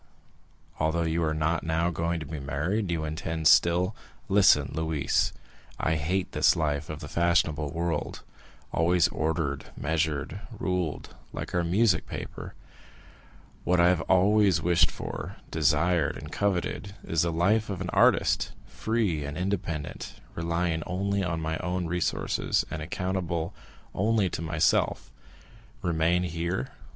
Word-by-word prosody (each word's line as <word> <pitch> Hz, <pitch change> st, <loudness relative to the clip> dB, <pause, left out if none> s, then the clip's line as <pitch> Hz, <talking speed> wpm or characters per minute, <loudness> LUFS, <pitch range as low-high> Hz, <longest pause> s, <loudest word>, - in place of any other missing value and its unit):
—although 80 Hz, +2 st, +1 dB
you 80 Hz, +1 st, 0 dB
are 80 Hz, -, +1 dB
not 80 Hz, +2 st, 0 dB
now 80 Hz, +2 st, +1 dB
going 85 Hz, 0 st, -1 dB
to 80 Hz, -, -6 dB
be 75 Hz, +1 st, -6 dB
married, 80 Hz, +9 st, -1 dB
you 80 Hz, -2 st, -1 dB
intend 80 Hz, 0 st, -1 dB
still——" 90 Hz, +6 st, +4 dB, 0.3 s
"Listen, 95 Hz, -8 st, +5 dB
Louise. 80 Hz, -2 st, 0 dB, 0.5 s
I 80 Hz, -, +1 dB
hate 85 Hz, +5 st, -1 dB
this -, -, +4 dB
life 75 Hz, -2 st, -1 dB
of 75 Hz, 0 st, -6 dB
the 75 Hz, -, -6 dB
fashionable 80 Hz, -2 st, +1 dB
world, 85 Hz, 0 st, -3 dB, 0.5 s
always 85 Hz, 0 st, +3 dB
ordered, 80 Hz, -3 st, -1 dB
measured, 80 Hz, +3 st, -1 dB, 0.2 s
ruled, 90 Hz, -9 st, -2 dB, 0.2 s
like -, -, -5 dB
our 90 Hz, -, +2 dB
music 90 Hz, +1 st, +2 dB
paper. -, -, -7 dB, 1.1 s
What 90 Hz, 0 st, +2 dB
I 85 Hz, +1 st, +6 dB
have 90 Hz, -2 st, +2 dB
always 100 Hz, +1 st, +4 dB
wished 85 Hz, -1 st, +3 dB
for, -, -, -6 dB, 0.2 s
desired, 80 Hz, +1 st, +2 dB
and -, -, -9 dB
coveted, 100 Hz, 0 st, -1 dB
is 80 Hz, -1 st, 0 dB
the 85 Hz, -, +1 dB
life 100 Hz, +7 st, +2 dB
of 95 Hz, -3 st, -3 dB
an 90 Hz, -1 st, -3 dB
artist, -, -, +3 dB
free 110 Hz, -9 st, -1 dB
and 70 Hz, +1 st, -5 dB
independent, 90 Hz, -5 st, -3 dB, 0.2 s
relying 85 Hz, 0 st, -1 dB
only 100 Hz, +2 st, -1 dB
on 85 Hz, -3 st, -1 dB
my 80 Hz, 0 st, -2 dB
own 90 Hz, 0 st, -2 dB
resources, 85 Hz, +1 st, 0 dB
and 75 Hz, +1 st, -4 dB
accountable 85 Hz, 0 st, -2 dB, 0.4 s
only 105 Hz, -1 st, +2 dB
to -, -, -4 dB
myself. 80 Hz, -1 st, +1 dB, 0.7 s
Remain 85 Hz, +1 st, +2 dB
here? 85 Hz, +1 st, -2 dB
85 Hz, 135 wpm, -27 LUFS, 80-90 Hz, 1.1 s, I